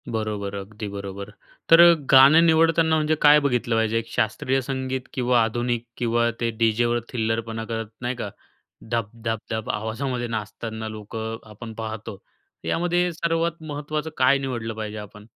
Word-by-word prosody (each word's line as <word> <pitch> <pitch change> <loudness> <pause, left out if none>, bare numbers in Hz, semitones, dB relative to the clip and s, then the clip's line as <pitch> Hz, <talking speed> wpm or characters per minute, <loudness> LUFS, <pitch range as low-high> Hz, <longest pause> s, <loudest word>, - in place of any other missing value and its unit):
बरोबर. 105 -3 -3
अगदी 105 +2 -6
बरोबर. 100 0 -6 0.4
तर 165 +1 +10 0.3
गाणं 140 +5 +8
निवडताना 165 0 +4
म्हणजे 155 0 +2
काय 150 0 +8
बघितलं 125 -5 0
पाहिजे? 115 0 +1
एक 115 - -8
शास्त्रीय 130 +5 0
संगीत 130 0 -3
किंवा 125 -2 +2
आधुनिक 120 +1 -1
किंवा 120 0 +1
ते 115 - 0
डीजेवर 120 +1 +2
थिल्लरपणा 115 -1 -2
करत 115 -1 -4
नाही 125 +1 -2
का? 105 - -5 0.6
धप-धप-धप 115 -1 -3
आवाजामध्ये 120 +3 -2
नाचताना 110 0 -5
लोकं 110 +1 -6
आपण 110 +2 -9
पाहतो. 110 -2 -6 0.5
यामध्ये 175 +1 +1
सर्वात 165 0 -1
महत्त्वाचं 150 +1 -4
काय 130 +2 +4
निवडलं 120 -5 -4
पाहिजे 110 -1 -5
आपण? 105 0 -11
115 Hz, 135 wpm, -24 LUFS, 110-135 Hz, 0.6 s, तर